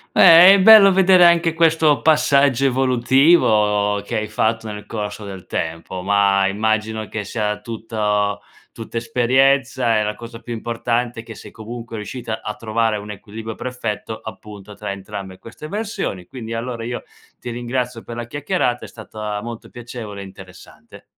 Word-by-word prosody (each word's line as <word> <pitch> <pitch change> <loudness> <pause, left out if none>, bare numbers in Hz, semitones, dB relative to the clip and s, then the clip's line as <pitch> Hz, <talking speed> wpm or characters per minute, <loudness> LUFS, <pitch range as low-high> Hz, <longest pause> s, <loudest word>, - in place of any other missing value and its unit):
Beh, 170 +3 +9
è 200 - +4
bello 210 -1 +9
vedere 185 -1 +6
anche 170 -1 +3
questo 160 -3 +3
passaggio 140 -4 +3
evolutivo 120 -5 +3
che - - -3
hai 110 0 -2
fatto 110 0 -1
nel 105 0 -8
corso 105 -1 -6
del 95 -2 -9
tempo. 85 +3 -4
Ma, 100 0 +3
immagino 110 +2 -1
che 105 +1 -5
sia 105 +1 -3
tutto 105 -3 -2 0.3
tutta 115 0 -8
esperienza 125 0 +2
e - - +1
la 105 0 -2
cosa 115 +1 -10
più 120 - -7
importante 120 +1 -2
è - - -17
che 115 - -10
sei, 105 0 -12
comunque, 115 +1 -9
riuscita 110 +1 -6
a 105 - -4
trovare 110 0 -1
un 105 +1 -9
equilibrio 110 +2 -8
perfetto, 115 -3 -5
appunto, 105 -2 -10
tra 105 -1 -5
entrambe 95 -1 -8
queste 115 +6 -11
versioni. 200 - -4
Quindi, 115 -3 -8
allora 115 0 -4
io 120 +1 -4 0.4
ti 120 - -7
ringrazio 120 0 -4
per 120 - -8
la 120 -1 -6
chiacchierata, 145 -2 -2
è - - -9
stata 105 -2 -7
molto 115 0 -8
piacevole 115 -4 -8
e - - -8
interessante. 95 -1 -15
115 Hz, 160 wpm, -20 LUFS, 105-125 Hz, 0.4 s, Beh